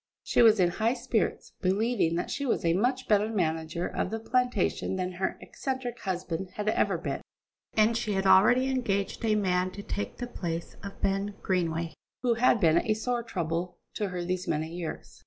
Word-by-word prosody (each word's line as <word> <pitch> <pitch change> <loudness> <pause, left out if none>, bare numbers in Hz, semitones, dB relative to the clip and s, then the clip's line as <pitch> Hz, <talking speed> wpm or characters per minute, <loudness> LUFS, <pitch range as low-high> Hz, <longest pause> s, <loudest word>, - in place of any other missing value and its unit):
She - - +3
was 220 -3 +7
in 180 -2 +5
high 225 +6 +1
spirits, 235 -3 -1
believing 195 -2 +1
that 175 - -2
she 280 - -2
was 250 -9 0
a 165 - +4
much 250 +7 0
better 210 0 +3
manager 165 -4 -1
of - - -2
the 225 - -3
plantation 245 -5 0
than 185 -1 -2
her 185 +1 -2
eccentric 260 -3 -4
husband 185 -1 -3
had 210 0 -3
ever - - +2
been, - - -3 0.5
and 220 +1 +4
she 220 -2 -1
had 195 0 0
already 220 +7 +6
engaged 225 -7 -1
a 220 -2 +3
man 185 -3 +1
to 200 - -7
take 205 - -4
the 245 - -3
place 170 -8 -5
of 200 -1 -9
Ben 195 +1 0
Greenway, 170 -3 0 0.3
who 245 -2 +3
had 235 0 +4
been 165 -3 +5
a 215 - +1
sore 240 +2 -1
trouble 175 -5 -3 0.2
to 205 -2 -2
her 180 -1 -4
these 180 0 -2
many 155 +1 -1
years. 170 -1 -6
200 Hz, 190 wpm, -28 LUFS, 180-230 Hz, 0.5 s, was